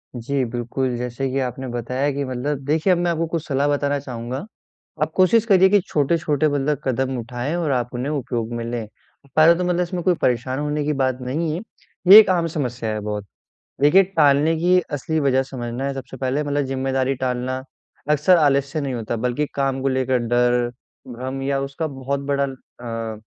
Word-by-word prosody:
जी, 130 +3 -1
बिल्कुल। 120 +2 -2
जैसे 125 +2 -3
कि 135 - 0
आपने 130 0 -3
बताया 125 +4 -1
कि 140 +1 -2
मतलब 130 +3 -3
देखिए 160 +6 +2
अब - - +1
मैं 175 0 +1
आपको 165 0 0
कुछ 165 -1 -3
सलाह 140 0 +1
बताना 145 0 +1
चाहूँगा। 125 -2 -5 0.7
आप 155 - -2
कोशिश 210 +4 +4
करिए 190 -3 +5
कि 205 +1 +5
छोटे-छोटे 150 0 +1
मतलब 145 0 0
कदम 130 0 -1
उठाएँ 120 +6 -4
और 165 -4 -1
आप 125 -2 0
उन्हें 125 +4 -2
उपयोग 120 -5 -3
में 120 0 -3
लें। 115 -2 -4 0.5
पहले 160 +2 +7
तो 180 - -2
मतलब 180 0 +1
इसमें 175 0 -2
कोई 185 - +4
परेशान 125 +2 0
होने 150 0 -1
की 150 - +1
बात 130 -2 0
नहीं 150 +6 -2
है, 175 - -4 0.5
ये 200 +4 +12
एक 220 - +5
आम 175 -2 +2
समस्या 125 -7 -3
है 110 - -3
बहुत। 105 -1 -4 0.6
देखिए, 150 +7 +6
टालने 155 -4 +3
की 180 +3 +4
असली 155 +3 -1
वजह 135 -2 +2
समझना 125 -1 -5
है 140 - -1
सबसे 135 0 -8
पहले 130 +3 -1
मतलब 145 -1 -1
ज़िम्मेदारी 135 0 -1
टालना 130 0 -2 0.5
अक्सर 150 +5 +4
आलस्य 140 -1 +2
नहीं 135 -2 -3
होता 120 -1 -3
बल्कि 125 +5 -1
काम 135 -1 0
को 135 - 0
लेकर 130 -1 +1
डर, 120 0 +1 0.4
भ्रम 130 +2 -5
या 135 0 0
उसका 140 +4 -3
बहुत 135 -1 -3
बड़ा 140 0 +2
अ, 115 -4 -7
135 Hz, 190 wpm, -22 LUFS, 125-150 Hz, 0.7 s, ये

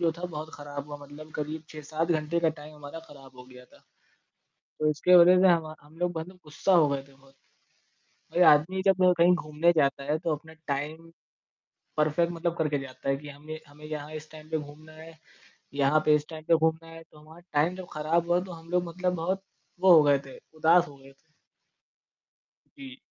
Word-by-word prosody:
जो 170 -1 +2
था 175 +2 -8
बहुत 155 -2 -6
खराब 145 -1 -7
हुआ, 145 - -6
मतलब 145 +2 -12
करीब 150 +1 -4
6-7 155 +2 -4
घंटे 155 +1 0
का 165 - +3
टाइम 155 -1 -8
हमारा 150 +2 -9
खराब 135 -2 -15
हो 125 - -11
गया 125 0 -15
था। - - -22 1.0
तो 155 - +1
इसके 180 +4 +3
वज़ह 180 +1 +7
से 190 - +6
हमा 160 -3 +1
हम 150 +2 -19
लोग 175 -1 -1
मतलब 180 +4 -8
गुस्सा 150 +6 -1
हो 160 -4 +5
गए 140 -1 -2
थे - - -20
बहुत। 135 0 -23 1.0
कोई 180 - +3
आदमी 170 +6 +1
जब 195 -1 +4 0.2
कहीं 175 +2 +6
घूमने 155 0 +1
जाता 140 -2 +1
है 150 +2 0
तो 165 -1 -1
अपने 160 +2 -15
टाइम 155 +4 -4 0.9
परफ़ेक्ट 155 +3 +1
मतलब 170 0 -2
करके 150 -3 0
जाता 135 0 -8
है 135 - +2
कि 145 +2 -11
हमें 150 +2 -9
हमें 145 +1 -16
यहाँ 155 0 -6
इस 155 0 -9
टाइम 155 0 -13
पे 160 - 0
घूमना 155 +1 -11
है, 160 +1 -13 0.6
यहाँ 140 +2 +3
पे 150 - +6
इस 150 0 0
टाइम 155 -1 -9
पे 170 - +6
घूमना 160 0 0
है 165 0 -11
तो 155 -1 -20
हमारा 155 +3 -15
टाइम 150 +5 +2
जब 185 -1 -8
खराब 165 +3 0
हुआ 175 +1 +4
तो 185 - -9
हम 165 0 -12
लोग 180 0 +1
मतलब 180 +2 -2
बहुत 185 +3 -2 0.4
वो 185 0 +7
हो 160 -3 +8
गए 145 -1 +4
थे, 135 - -11 0.2
उदास 165 +2 +4
हो 140 - -14
गए 135 0 -16
थे। - - -31 1.6
जी। 265 -2 -10
155 Hz, 210 wpm, -27 LUFS, 145-170 Hz, 1.6 s, हो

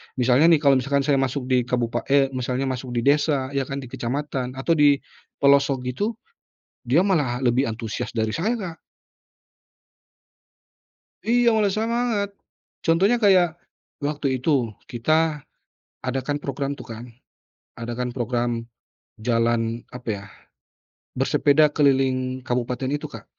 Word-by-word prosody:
Misalnya 125 +4 +4
nih, 160 -3 +4
kalau 135 -2 +5
misalkan 140 +2 0
saya 140 -1 +2
masuk 135 0 -2
di 125 -1 +2
kabupa 120 -1 0
eee, 135 -1 +3
misalnya 130 0 -2
masuk 130 -2 -4
di 120 - 0
desa 140 -1 +2
ya 135 -2 -1
kan, 135 0 -4
di 125 - -11
kecamatan, 130 0 -3
atau 135 +5 -2
di 145 -3 +5 0.5
pelosok 140 -2 +4
gitu, 200 - -2 0.7
dia 135 +8 +4
malah 145 -11 +1
lebih 125 +1 +2
antusias 110 -2 -4
dari 110 -2 0
saya, 210 +8 0
Kak. 185 -8 -5 2.5
Iya, 240 +1 +4
malah 215 -3 +2
semangat. 225 -2 0 0.6
Contohnya 195 +9 +3
kayak 180 -6 +4 0.4
waktu 145 -2 -1
itu, 130 -4 +1 0.2
kita 155 +4 +1 0.6
adakan 135 +3 -2
program 140 -1 -3
tuh - - -10
kan. 115 +1 -8 0.7
Adakan 120 +1 -4
program, 120 -2 -1 0.6
jalan 115 0 0
apa 125 -1 -9
yah? 100 -1 -5 0.9
Bersepeda 150 +1 +3
keliling 130 -3 +1
kabupaten 125 +1 -2
itu, 145 - -3
Kak. - - -10
135 Hz, 130 wpm, -23 LUFS, 125-150 Hz, 2.5 s, kalau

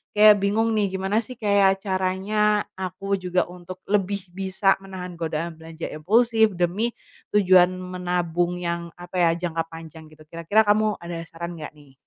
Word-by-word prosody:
kayak 210 0 +7
bingung 210 +3 +1
nih, 210 -2 +2
gimana 190 +2 0
sih 255 +4 -10
kayak 200 -3 +3
caranya 200 +2 +1 0.2
aku 190 +2 -2
juga 180 0 +1
untuk 180 +1 -10
lebih 200 -1 0
bisa 195 +1 +1
menahan 185 -2 -7
godaan 165 0 -3
belanja 160 0 -7
impulsif 220 +6 +3
demi 180 +6 0 0.5
tujuan 185 -3 +6
menabung 180 -1 -2
yang 170 -1 -3
apa 175 +1 -10
ya, - - +4 0.2
jangka 165 -1 -2
panjang 165 -1 -10
gitu. 155 0 -16
Kira-kira 170 +7 +2
kamu 210 0 +3
ada 170 -1 -5
saran 170 +2 -7
nggak 150 - -7
nih? 145 -2 -19
185 Hz, 155 wpm, -24 LUFS, 170-205 Hz, 0.5 s, kayak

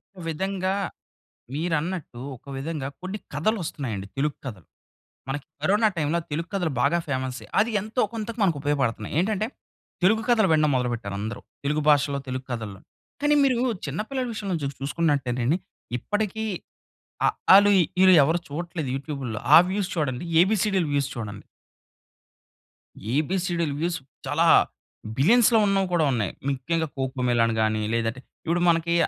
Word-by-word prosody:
ఒక 185 - -10
విధంగా, 190 +3 -1 0.8
మీరన్నట్టు 160 -4 -2 0.2
ఒక 140 - -20
విధంగా 145 -1 -3
కొన్ని 190 +3 -4 0.2
కథలొస్తున్నాయండి 145 - -2
తెలుగు 145 +1 0
కథలు. 105 -10 -7 0.6
మనకి 135 +1 -4 0.2
కరోనా 210 +6 +4
టైమ్‌లో 160 +1 +1
తెలుగు 165 +4 -2
కథలు 175 -4 0
బాగా 150 +5 +3
ఫేమసే. 130 -2 -3 0.2
అది 225 - +2
ఎంతో 220 +4 -1
కొంతకు 225 +1 -5
మనకు 170 -6 +3
ఉపయోగపడుతున్నాయి. 135 -7 -1
ఏంటంటే, 210 +2 0 0.6
తెలుగు 220 +3 +4
కథలు 220 -5 +4
వినడం 155 -1 +4
మొదలుపెట్టారు 120 -5 -2
అందరూ. 110 +3 -4 0.2
తెలుగు 150 +2 +1
భాషలో, 145 -1 +4
తెలుగు 130 0 -4
కథల్లో. 110 -5 -5 0.4
కానీ, 295 0 +4
మీరు 255 -3 +2 0.3
చిన్న 145 +6 -3
పిల్లల 260 -2 -1
విషయంలో 200 -5 -2
చుసు 140 -1 -3
చూసుకున్నట్టేనండి 140 -2 0 0.4
ఇప్పటికి 215 - -2 0.8
అఆలు, 200 +2 +6 0.3
ఇఈలు 185 -1 +8
ఎవరూ 160 +4 +2
చూడట్లేదు 160 -1 -4
యూట్యూబుల్లో. 135 -6 -5 0.2
ఆ - - +13
వ్యూస్ 195 -1 -1
చూడండి. 140 -2 -1 0.2
ఏబీసీడీలు 195 -3 +1
వ్యూస్ 140 -1 0
చూడండి. 105 -3 -6 1.7
ఏబీసీడీ‌లు 170 0 0
వ్యూస్ 170 -1 -1 0.3
చాలా - - +2 0.7
బిలియన్స్‌లో 225 - +5
ఉన్నవి 195 -1 +2
కూడా 160 -3 +3
ఉన్నాయి. 105 -7 -1 0.2
ముఖ్యంగా 160 +5 -1
కోక్ 130 0 -2
మెలాన్ 115 -1 +3
గాని, 110 0 +1
లేదంటే 115 +1 -1 0.3
ఇప్పుడు 170 +2 +1
మనకి 170 0 +2
155 Hz, 130 wpm, -25 LUFS, 130-190 Hz, 1.7 s, ఆ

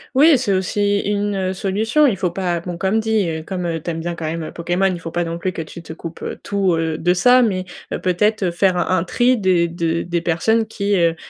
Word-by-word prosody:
Oui, 290 +1 +6
c'est 240 -5 -1
aussi 200 +2 +1
une, 205 0 -1
heu, 190 -1 -1
solution. 215 +10 +1
Il 235 -9 +2
faut 180 -1 -1
pas 175 -1 -1
bon 175 0 -6
comme 195 +5 +1
dit, 220 -4 +1
heu, 160 -1 -4
comme, 180 +1 -4
heu, 165 -2 -2
tu 170 - -5
aimes 165 0 -4
bien 175 +1 -3
quand 165 -1 -6
même, 165 +1 -3
heu, - - -6
Pokémon, 175 +3 0
il 175 - -5
faut 165 - -6
pas 175 +1 -1
non 165 0 -4
plus 185 +2 -3
que 165 - -4
tu 160 +2 -9
te 165 - -9
coupes, 165 0 -9
heu, - - -5
tout, 195 -3 +1
heu, 160 -1 -1
de 175 +2 +2
ça, 250 +8 +5
mais, 195 -6 +1 0.3
heu, - - -2
peut-être, 205 +4 +1
heu, 180 - +1
faire 185 +2 +2
un 175 - -1
un - - -1
tri 245 +6 +2
des 180 -4 +2
de 165 0 -1
des 170 0 -2
personnes 175 +7 +1
qui, 200 -2 -1
heu, 170 -1 +2
180 Hz, 265 wpm, -20 LUFS, 170-205 Hz, 0.3 s, Oui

